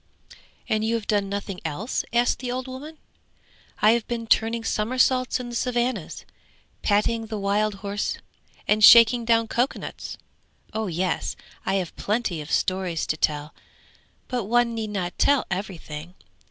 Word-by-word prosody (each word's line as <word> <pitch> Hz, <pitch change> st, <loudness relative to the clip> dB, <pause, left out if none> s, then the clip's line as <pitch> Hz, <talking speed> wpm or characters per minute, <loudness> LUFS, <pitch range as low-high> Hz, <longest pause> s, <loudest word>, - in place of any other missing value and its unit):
'And 215 Hz, 0 st, +1 dB
you 225 Hz, +1 st, +1 dB
have 225 Hz, -2 st, -3 dB
done 205 Hz, -2 st, 0 dB
nothing 200 Hz, -2 st, -4 dB
else?' 165 Hz, -, -2 dB
asked 240 Hz, +1 st, +2 dB
the 250 Hz, -1 st, -4 dB
old 255 Hz, +1 st, -3 dB
woman. 285 Hz, +5 st, -8 dB, 0.9 s
'I 215 Hz, -, +8 dB
have 230 Hz, -1 st, 0 dB
been 235 Hz, -2 st, -3 dB
turning 225 Hz, +1 st, +2 dB
somersaults 255 Hz, +4 st, +1 dB
in 245 Hz, -1 st, -6 dB
the 240 Hz, -, -6 dB
Savannahs, 240 Hz, -6 st, -1 dB, 0.6 s
patting 220 Hz, +2 st, +1 dB
the 215 Hz, -1 st, -4 dB
wild 205 Hz, +1 st, +1 dB
horse, 200 Hz, +1 st, -2 dB, 0.5 s
and 215 Hz, 0 st, +3 dB
shaking 235 Hz, +1 st, +8 dB
down 230 Hz, -1 st, +3 dB
cocoanuts! 245 Hz, +4 st, -3 dB, 0.6 s
Oh 220 Hz, 0 st, -2 dB
yes, 180 Hz, +1 st, -1 dB, 0.3 s
I 195 Hz, -, +2 dB
have 185 Hz, -4 st, -2 dB
plenty 210 Hz, -6 st, -1 dB
of 150 Hz, -, -9 dB
stories 185 Hz, -3 st, 0 dB
to -, -, -1 dB
tell! 150 Hz, -1 st, -1 dB, 0.7 s
But 245 Hz, -5 st, -2 dB
one 240 Hz, +2 st, +2 dB
need 220 Hz, -2 st, -3 dB
not 185 Hz, -4 st, -4 dB
tell 285 Hz, -2 st, +4 dB
everything. 175 Hz, -3 st, -5 dB
220 Hz, 150 wpm, -25 LUFS, 195-240 Hz, 0.9 s, I